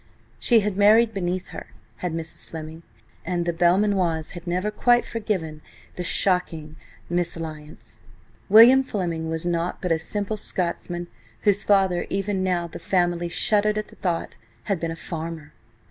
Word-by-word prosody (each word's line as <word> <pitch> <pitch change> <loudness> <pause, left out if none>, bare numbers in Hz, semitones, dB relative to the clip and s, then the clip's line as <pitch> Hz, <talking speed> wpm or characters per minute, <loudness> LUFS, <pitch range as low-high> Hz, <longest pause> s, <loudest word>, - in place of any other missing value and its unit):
She 235 -3 +4
had 205 -2 -2
married 220 +3 +5
beneath 185 -1 -2
her, - - -8 0.3
had 180 - -3
Mrs. 165 0 -6
Fleming, 160 0 -8 0.4
and 175 0 -1
the 170 - 0
Belmanoirs 175 -2 +2
had 175 0 -10
never 180 +4 -1
quite 240 +3 +3
forgiven 185 -9 -3 0.3
the 180 - -4
shocking 170 -4 0 0.3
mésalliance. 155 -9 -5 0.5
William 235 +6 +9
Fleming 170 -10 -3
was 160 +1 -3
nought 170 0 -1
but 180 - -2
a 160 - +2
simple 205 +5 -3
Scotsman, 175 -2 -3 0.3
whose 205 -1 +2
father–even 195 0 +1
now 180 -2 0
the 170 - -8
family 175 -2 0
shuddered 210 +4 +1
at 215 - -3
the - - -16
thought–had 165 - -4
been 165 - -2
a 165 - -4
farmer! 160 -2 -6
175 Hz, 145 wpm, -24 LUFS, 165-200 Hz, 0.5 s, William